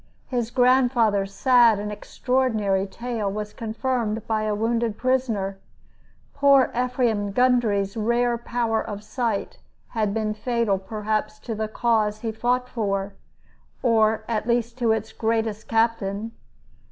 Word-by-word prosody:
His 240 -3 -1
grandfather's 245 -6 +3
sad 240 -1 +5
and 210 +1 -4
extraordinary 210 -3 0
tale 225 0 -3
was 210 +1 -5
confirmed 225 -1 -2
by 215 -1 0
a 210 -1 0
wounded 230 0 0
prisoner. 230 -7 0 0.7
Poor 280 -2 +4
Ephraim 240 -5 0
Gundry's 225 -5 +2
rare 235 +2 +1
power 235 -1 -1
of 205 -2 -6
sight 225 -2 -3 0.3
had 215 -3 -1
been 215 0 -1
fatal 225 -3 0
perhaps 215 +1 -3
to 230 - -4
the 215 0 -2
cause 215 -2 0
he 225 - -2
fought 245 +3 0
for, 200 -4 -2 0.7
or 220 -2 +3
at 225 -1 -2
least 235 -1 0
to 235 -2 +2
its 220 0 -1
greatest 220 -1 -1
captain. 225 -2 0
225 Hz, 130 wpm, -24 LUFS, 210-240 Hz, 0.7 s, sad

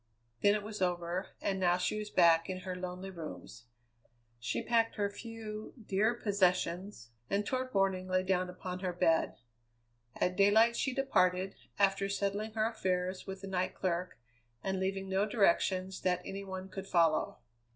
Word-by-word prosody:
Then 205 0 +5
it 210 - -2
was 210 -1 -7
over, 175 +1 -1
and 195 -1 -1
now 180 -1 +3
she 185 +4 -1
was 210 0 -5
back 165 -2 +5
in 185 0 -3
her 185 -1 -4
lonely 180 +1 -5
rooms. 160 -8 -9 0.7
She 120 - -2
packed 230 -1 +2
her 205 -1 0
few, 220 -1 -7
dear 215 +2 +1
possessions, 185 - 0 0.2
and 200 +1 +1
toward 255 +2 -2
morning 190 -2 +1
lay 185 0 +1
down 185 -1 +1
upon 180 0 -6
her 185 -1 -2
bed. 170 -2 +2 0.8
At 180 0 0
daylight 220 +4 +5
she 265 - 0
departed, 190 -8 +2 0.2
after 195 0 +2
settling 200 +2 -1
her 215 -1 +1
affairs 185 -4 -2
with 190 0 -6
the 195 - -6
night 185 -1 -1
clerk 180 0 -2 0.5
and 190 -1 -1
leaving 195 0 -2
no 190 +2 +1
directions 190 -3 +2
that 180 -1 +1
any 195 +1 -5
one 190 -1 -6
could 195 0 -7
follow. 165 -4 +2
190 Hz, 160 wpm, -33 LUFS, 180-205 Hz, 0.8 s, Then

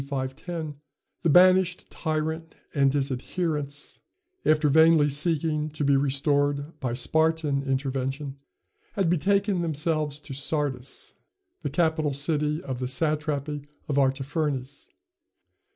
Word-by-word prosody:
510, 140 +3 -4 0.4
the 170 - +2
banished 185 +2 +5
tyrant 160 0 -3 0.2
and 140 -2 +3
his 140 0 0
adherents, 145 +1 -3 0.4
after 155 0 +3
vainly 160 +1 +6
seeking 155 +1 0
to 150 0 -4
be 140 0 +4
restored 145 +2 0
by 125 -3 -2
Spartan 160 +2 +1
intervention, 135 +1 -2 0.5
had 190 -4 +1
betaken 195 +2 +2
themselves 155 -2 0
to 140 - -7
Sardis, 140 -2 -3 0.5
the - - -2
capital 160 -4 +1
city 150 +2 0
of 130 -2 -4
the 130 - -2
satrapy 150 +1 -1 0.3
of 145 -1 +1
Artaphernes. 135 0 -1
150 Hz, 110 wpm, -26 LUFS, 140-160 Hz, 0.5 s, vainly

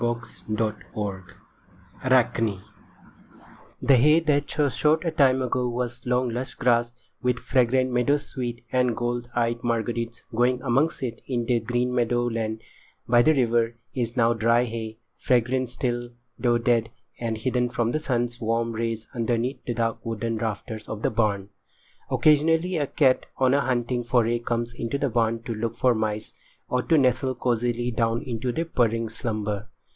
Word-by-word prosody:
[Pg 120 0 -1 0.3
82] 105 -3 -3 0.8
ARACHNE 115 -6 +2 1.2
The 135 -2 +6
hay 150 +6 +6
that 150 -3 +1
so 150 -2 +1
short 155 +6 +2
a 165 - +1
time 130 -4 +3
ago 125 0 0
was 120 0 -4
long, 125 0 +1
lush 125 +3 -4
grass, 120 -1 +2 0.3
with 125 -2 +1
fragrant 130 0 +2
meadow 125 +4 +3
sweet 120 -5 -5
and 125 -2 +1
gold 120 0 -2
eyed 120 0 0
marguerites 115 0 -2
growing 125 +2 +2
amongst 135 +5 +1
it 120 -2 -4
in 120 -3 -1
the 120 0 +2
green 125 +2 -1
meadow 120 0 +1
land 110 -1 -3 0.4
by 120 0 +5
the 155 +5 +4
river, 120 -2 +2 0.2
is 120 -1 -2
now 115 -1 +4
dry 115 +1 +3
hay—fragrant 120 +2 -1
still, 120 -1 -2 0.3
though 120 -1 +3
dead, 115 -1 +1 0.3
and 115 -2 -2
hidden 125 +2 0
from 120 -1 0
the 155 - 0
sun's 120 -4 -2
warm 115 +1 0
rays 115 -1 -2
underneath 120 +2 -1
the 120 - -2
dark 115 0 -1
wooden 115 0 -2
rafters 110 0 -4
of 110 0 -5
the - - +2
barn. 105 -3 0 0.6
Occasionally 160 +4 +3
a 145 -2 0
cat 130 -3 +2
on 130 0 +3
a 140 - +3
hunting 120 -2 0
foray 120 -1 +2
comes 120 0 -2
into 120 +3 -3
the 140 0 0
barn 115 -1 +1
to 115 - -3
look 115 +1 -3
for 125 +1 +3
mice, 110 -1 -2 0.4
or 125 - +1
to 160 +5 +3
nestle 130 -1 +2
cosily 120 0 0
down 115 +2 0
into 125 -2 -2
purring 115 -7 +1
slumber. 110 -2 -3
120 Hz, 160 wpm, -25 LUFS, 115-125 Hz, 1.2 s, The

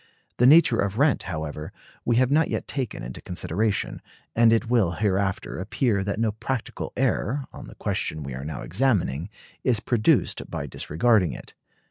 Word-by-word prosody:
The 125 - +5
nature 145 -5 +6
of 100 +1 0
rent, 140 +1 +3
however, 75 -2 -5 0.3
we 120 - +2
have 130 +2 +3
not 160 +2 +4
yet - - -3
taken 130 - -3
into 60 +1 -7
consideration; 95 +5 -2 0.3
and 115 0 +6
it 115 +1 +2
will 110 -8 +2
hereafter 100 -1 -1
appear 105 +1 0
that 100 +1 -2
no 115 -1 +2
practical 115 +3 -4
error, 135 +6 0
on - - -9
the - - -12
question 75 -1 -2
we 70 -1 -6
are 65 +2 -6
now 75 +2 -5
examining, 90 - 0 0.3
is 120 -5 +2
produced 110 0 +1
by - - -4
disregarding 95 +3 +1
it. - - -10
105 Hz, 165 wpm, -25 LUFS, 85-120 Hz, 0.3 s, nature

